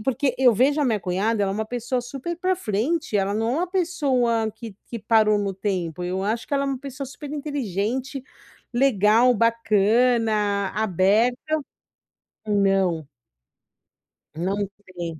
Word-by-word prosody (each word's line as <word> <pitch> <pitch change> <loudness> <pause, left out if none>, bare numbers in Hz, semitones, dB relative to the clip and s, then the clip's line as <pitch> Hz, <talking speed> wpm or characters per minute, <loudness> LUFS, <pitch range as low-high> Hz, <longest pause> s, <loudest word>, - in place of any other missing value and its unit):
e - - -8
porque 265 +2 0
eu 255 -2 +6
vejo 280 +7 +3
a - - +2
minha 225 -5 +1
cunhada, 200 +5 0
ela 195 - -1
é - - -4
uma 220 +1 -2
pessoa 245 +2 -2
super 275 +7 -6
pra 370 +2 0
frente, 260 - -1
ela 195 0 +1
não 225 +2 0
é - - 0
uma 355 +1 -2
pessoa 260 - +1
que 220 -1 -10
que 235 - -5
parou 215 -1 +3
no 200 -1 -2
tempo, 180 -4 -3
eu 185 +2 -2
acho 225 +3 -1
que - - -12
ela 280 0 +1
é - - -2
uma 270 -2 -2
pessoa 275 0 -7
superinteligente, 270 - -4 0.5
legal, 240 -1 +4
bacana, 220 -2 +2
aberta. 215 +4 +2 1.1
Não. 195 -6 +1 1.3
Não 185 +4 -1 0.3
tem. 170 -4 -7
225 Hz, 150 wpm, -23 LUFS, 200-265 Hz, 1.3 s, eu